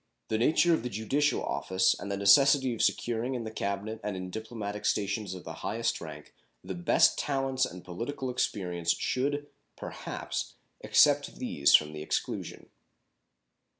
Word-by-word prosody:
The 110 - 0
nature 160 +7 +4
of 160 - +1
the 125 - -4
judicial 135 +8 0
office 95 0 +1
and 100 - -5
the 100 - -1
necessity 130 +6 +5
of 115 - -4
securing 120 +2 0
in 120 - -3
the 110 - -6
Cabinet 105 +1 -3
and 105 -3 -3
in 90 0 -6
diplomatic 110 -1 -5
stations 100 -1 -1
of 90 - -9
the - - -7
highest 115 +2 -1
rank 75 -2 -9 0.3
the 95 +1 -5
best 85 -1 +3
talents 135 -2 0
and 90 +1 -11
political 120 +8 -4
experience 90 -8 -1
should, 145 +3 -1 0.3
perhaps, - - -5 0.2
except - - +3
these - - +3
from 75 0 +3
the 75 - -6
exclusion. 75 - -4
110 Hz, 150 wpm, -29 LUFS, 95-130 Hz, 0.3 s, necessity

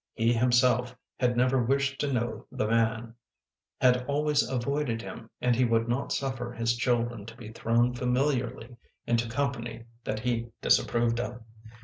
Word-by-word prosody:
He 115 +1 +2
himself 125 +1 +3 0.2
had 125 -1 +1
never 130 +1 +3
wished 135 +3 0
to 145 - 0
know 120 -2 -2
the - - -1
man; 115 0 +1 0.7
had 125 -1 +4
always 145 0 +2
avoided 130 -1 -1
him 115 0 -9
and 125 -1 +2
he 125 - +3
would 115 -1 +2
not 120 +3 -1
suffer 130 -3 -2
his 115 0 0
children 120 -2 0
to 115 +1 -10
be 110 -3 -9
thrown 115 +2 +1
familiarly 125 -1 -1 0.3
into 115 -1 +1
company 120 -3 -3 0.2
that 110 0 -3
he 120 -1 -1 0.2
disapproved 120 0 +2
of. 120 -1 -5
120 Hz, 150 wpm, -28 LUFS, 115-125 Hz, 0.7 s, had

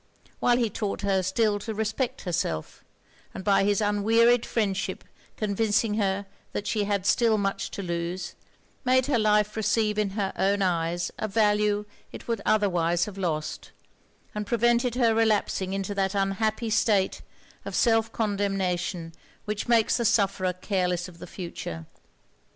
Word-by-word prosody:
while 240 0 +3
he 240 -2 +2
taught 205 -2 -3
her 195 -1 +1
still 205 +3 +1
to 220 +1 -5
respect 220 +4 -2
herself; 165 - -3 0.5
and - - -6
by 200 -1 +3
his 205 +1 +2
unwearied 225 +3 +3
friendship 200 -3 -1 0.3
convincing 215 +1 +1
her 200 -2 0 0.3
that 205 - -3
she 210 -2 0
had 200 -2 -1
still 230 -1 +3
much 195 -1 -1
to 200 - -6
lose, 175 +1 -3 0.5
made 260 -1 +3
her 265 -4 +1
life 210 -1 +2
receive 215 0 +1
in 210 -2 +1
her 195 -2 -1
own 200 +1 +1
eyes 170 -1 0
a 215 - -1
value 210 -1 +2 0.3
it - - -10
would 230 -3 -1
otherwise 175 -5 +2
have 200 -2 -8
lost; 155 -4 -3 0.6
and 210 -1 -4
prevented 240 +1 +2
her 235 -3 +3
relapsing 215 -4 +1
into 195 +1 -2
that 195 0 -1
unhappy 215 +3 0
state 205 -3 +2 0.4
of - - -5
self 225 -1 +3
condemnation 195 -6 -1 0.3
which 210 +1 -3
makes 230 -2 +3
the 235 - -1
sufferer 195 -4 +2
careless 180 -1 -1
of 175 -2 -14
the - - -9
future. 85 - -6
205 Hz, 150 wpm, -26 LUFS, 190-220 Hz, 0.6 s, while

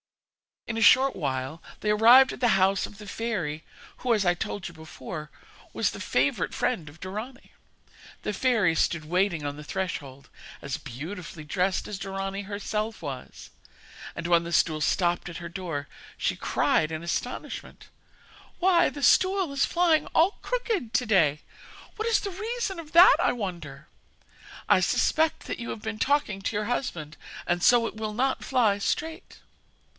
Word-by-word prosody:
In 225 - -4
a - - -1
short 265 +3 +6
while 135 0 -3 0.2
they 210 - +1
arrived 240 +5 +7
at - - -9
the 245 - +3
house 190 +1 +3
of 205 - -15
the 210 - -10
fairy 195 -9 -3 0.3
who, 245 -2 +1
as 205 -3 0
I 175 - +4
told 180 +2 -4
you 175 - -10
before, 160 -1 -8 0.4
was - - +1
the - - -8
favourite - - 0
friend 215 -11 -1
of 150 +4 -16
Dorani. 215 +8 -7 0.7
The 210 - -2
fairy 215 -6 +2
stood 165 -1 0
waiting 175 -2 0
on 145 0 -4
the 150 - -8
threshold, 145 -6 -5 0.3
as 140 -2 -4
beautifully 160 - -8
dressed 180 +5 -1
as 200 -2 -6
Dorani 195 +1 -4
herself 210 +2 -3
was, 135 -4 -8 0.6
and 170 - -6
when 170 -1 +3
the 170 - -6
stool 155 -2 +2
stopped 175 +2 +1
at 170 - -7
her 170 -1 -7
door 165 -6 -5 0.3
she - - 0
cried 155 0 +1
in 160 +1 -4
astonishment: 170 - -5 0.7
'Why, 350 -1 +4
the 285 - -8
stool 375 +1 +4
is 280 0 +2
flying 340 -3 +2
all 345 +6 +3
crooked 445 - -2
to 250 0 +2
day! 165 -9 +3 0.6
What 440 +1 -2
is 445 -3 +3
the 400 - -4
reason 425 -1 -3
of 320 0 -10
that, 345 +3 +8
I - - +2
wonder? 170 - -6 0.8
I - - +6
suspect 315 0 +1
that - - -5
you 235 - -5
have 215 - -5
been 220 -1 -4
talking 275 -9 +1
to 205 - -3
your 210 0 -1
husband, 175 - -3 0.3
and 175 0 0
so 240 +4 +5
it 225 - -5
will 215 -1 -3
not 260 +4 0
fly 230 -6 +2
straight.' 320 - -3
200 Hz, 170 wpm, -27 LUFS, 170-255 Hz, 0.8 s, that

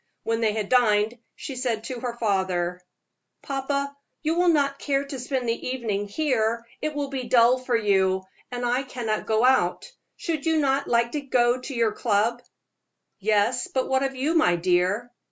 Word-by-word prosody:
When 225 0 -1
they 220 -2 +2
had 215 -2 -2
dined 225 -1 +3 0.2
she 275 - -7
said 240 -4 -2
to 250 0 -5
her 240 -1 -4
father: 185 -5 0 0.6
"Papa, 280 +1 -2 0.3
you 315 +1 +1
will 355 +1 +2
not 280 -4 +2
care 280 -1 0
to 275 -2 -6
spend 255 0 -2
the 230 0 -2
evening 220 -6 -2
here; 230 -2 0 0.2
it 305 -1 -2
will 285 -1 -2
be 265 -2 -4
dull 240 +1 +5
for 255 -2 0
you, 190 -3 +2 0.3
and 245 0 -3
I 245 +2 +1
cannot 240 -5 -3
go 220 +2 +3
out. 260 - +2 0.3
Should 330 -6 -3
you 320 -1 +3
not 280 -1 +1
like 235 0 +2
to 300 - -2
go 250 -2 +2
to 265 +1 -6
your 230 -2 +2
club?" 225 +2 0 0.8
"Yes; 215 +4 +1
but 260 -1 -1
what 265 0 +2
of 270 0 -1
you, 280 +5 0
my 315 - +4
dear?" 180 +7 +1
245 Hz, 180 wpm, -25 LUFS, 220-270 Hz, 0.8 s, dull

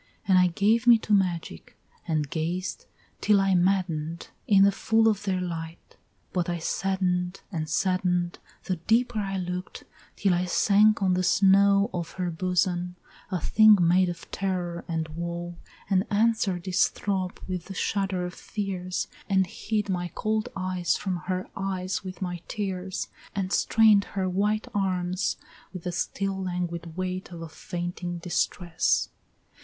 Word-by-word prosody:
Then 190 - +5
I 180 0 +6
gave 215 +7 +2
me 235 -1 +9
to 215 -1 -2
magic, 175 - -1 0.3
and 155 -3 0
gazed 175 +5 -3 0.3
till 210 -1 +4
I 195 0 +2
madden'd 175 -3 0 0.2
In 195 -2 +6
the 200 - +6
full 225 +3 +2
of 210 -2 +1
their 190 -2 0
light, 165 -2 -6 0.4
but 175 -2 0
I 175 - -1
sadden'd 180 +1 -1
and 155 -4 -3
sadden'd 180 -2 0 0.2
The 185 - -2
deeper 225 +6 +1
I 195 -1 -2
look'd, 180 0 -5 0.3
till 195 -3 +2
I 175 +1 +1
sank 205 +3 +4
on 185 -1 +3
the 180 - +1
snow 200 +2 +4
Of 170 -2 -4
her 180 -2 -2
bosom, 180 +1 0 0.3
a 185 -3 -1
thing 215 +5 +6
made 180 +1 +4
of 175 -1 -8
terror 180 -3 -2
and 160 -1 -2
woe, 170 +1 -5 0.3
And 190 0 +2
answer'd 205 -4 +1
its 185 0 +4
throb 190 -3 -3
with 180 -2 -4
the 195 - -8
shudder 190 -2 -1
of 180 - -6
fears, 185 -3 -4 0.2
And 190 -1 +3
hid 210 +3 -2
my 180 -2 -1
cold 215 +2 -1
eyes 185 -2 0
from 185 -3 -2
her 185 0 -2
eyes 190 0 -2
with 185 0 -6
my 175 -2 -4
tears, 190 -3 -3 0.3
And 190 -1 -1
strain'd 215 -3 +5
her 190 -2 -2
white 205 +4 0
arms 185 -2 0 0.3
with 185 -3 -8
the 180 - -2
still 195 +2 -2
languid 175 -2 -4
weight 185 0 -3
Of 170 -1 -7
a - - -6
fainting 175 +1 -5
distress. 170 0 0
185 Hz, 155 wpm, -27 LUFS, 175-195 Hz, 0.4 s, me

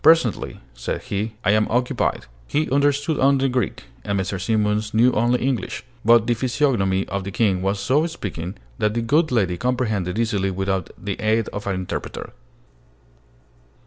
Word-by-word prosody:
"Presently," 160 - +3
said - - -4
he: 105 +2 -3
"I 100 - +5
am 110 +1 +3
occupied." 125 +2 0 0.2
He 155 +2 0
understood 145 +2 +2
only 135 0 +4
Greek, 125 -4 -1 0.2
and 100 -1 -1
Mrs. 95 0 -3
Simons 105 -1 +1
knew 120 +3 +5
only 120 +2 +2
English; 130 -6 -2 0.2
but 115 0 +6
the 120 - +2
physiognomy 115 -6 +1
of 100 0 -3
the 100 - -5
King 95 -2 +1
was 95 +1 0
so 140 +10 +2
speaking 95 - -5 0.2
that 105 +1 +1
the 115 - 0
good 155 +6 +2
lady 95 -7 +1
comprehended 110 -7 -1
easily 105 -4 +1
without 95 -1 -1
the 100 +1 -4
aid 110 +1 +1
of 100 0 -6
an 100 - 0
interpreter. 95 -1 -5
110 Hz, 160 wpm, -22 LUFS, 95-125 Hz, 0.2 s, but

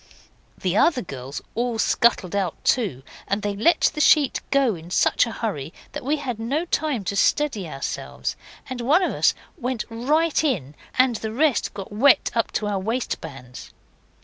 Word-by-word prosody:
The 185 0 -1
other 260 +3 +3
girls 135 -4 -7
all 240 0 -1
scuttled 220 -5 +2
out 190 -5 0
too, 195 - +1 0.2
and 200 +1 -1
they 205 -1 -1
let 225 +12 +3
the 300 - -2
sheet 290 -2 +4
go 275 -5 +3
in 165 -1 -10
such 185 - +3
a - - -4
hurry 165 - -4 0.2
that - - -6
we 285 +4 +1
had 255 -6 -4
no 275 +9 -1
time 300 - -1
to 195 +2 -3
steady 215 - +1
ourselves, 135 -2 -4 0.3
and 255 -2 -5
one 300 +10 +3
of - - +1
us - - +3 0.2
went 250 -3 -2
right 300 +8 +1
in, 180 - -1 0.2
and 255 -3 +4
the 220 0 -4
rest 265 -3 +1
got 195 -1 -7
wet 250 +6 +4
up 230 -1 0
to 215 - -1
our 205 -2 -1
waistbands. 160 - -5
230 Hz, 175 wpm, -23 LUFS, 195-270 Hz, 0.3 s, sheet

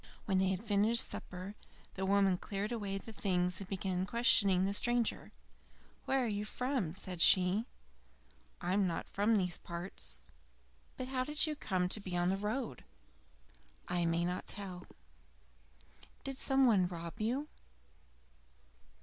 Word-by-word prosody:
When 190 -3 +2
they 190 - +3
had 190 +2 -2
finished 220 +2 +4
supper, 185 +2 -7 0.4
the 190 0 -3
woman 195 -2 +3
cleared 205 +2 -3
away 205 -4 -2
the 225 +3 -9
things 180 -2 0
and 195 - -8
began 190 -1 -2
questioning 200 -5 +4
the 200 - 0
stranger. 240 +2 0 0.7
"Where 270 -1 +2
are - - 0
you 205 -1 -2
from?" 235 - -2
said 185 -3 -5
she. 190 +5 +5 0.9
"I 180 0 -1
am 200 -1 +3
not 170 - -3
from 210 +3 +2
these 180 -3 +1
parts." 170 +2 -6 0.7
"But 255 0 -4
how 255 -1 0
did 300 +3 +1
you 305 -1 -2
come 185 -9 0
to 210 - +1
be 185 -3 -4
on 175 0 +2
the - - +1
road?" 210 - -3 1.0
"I 175 -1 +1
may 170 +1 +1
not 180 +1 -3
tell." 185 -3 -5 1.4
"Did 270 -1 -4
some 270 -1 +4
one 200 -7 +4
rob 170 +3 -7
you?" 255 +7 -1
195 Hz, 150 wpm, -34 LUFS, 180-230 Hz, 1.4 s, she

